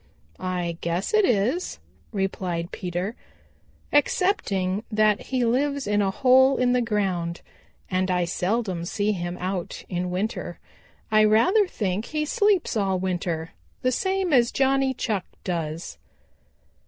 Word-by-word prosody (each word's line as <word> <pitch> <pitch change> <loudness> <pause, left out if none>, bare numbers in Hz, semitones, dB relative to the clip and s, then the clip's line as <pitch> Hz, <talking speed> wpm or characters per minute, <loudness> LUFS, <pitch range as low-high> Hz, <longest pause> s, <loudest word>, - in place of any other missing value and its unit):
"I 175 -2 -3
guess 170 - -2
it 430 -2 +5
is," 245 - 0 0.3
replied 185 -4 -2
Peter, 180 +5 -3 0.8
"excepting 210 - +1
that 215 -1 +2
he 255 -2 +1
lives 280 +4 +1
in 205 0 +2
a 195 - +2
hole 260 +5 +5
in 250 0 +2
the 250 - +3
ground, 190 -7 -1 0.5
and 185 0 0
I 180 -1 +2
seldom 185 0 -1
see 205 +4 0
him 175 -2 -3
out 185 -1 -4
in 180 0 -2
winter. 190 +5 -3 0.5
I 215 0 +6
rather 365 - +4
think 205 - -2
he 305 -1 -2
sleeps 410 - +2
all 195 -3 +1
winter, 175 -3 -2 0.3
the 255 - +3
same 380 +3 0
as 240 -3 +4
Johnny 270 0 +2
Chuck 210 -6 -2 0.2
does." 165 -2 -4
205 Hz, 130 wpm, -25 LUFS, 180-255 Hz, 0.8 s, I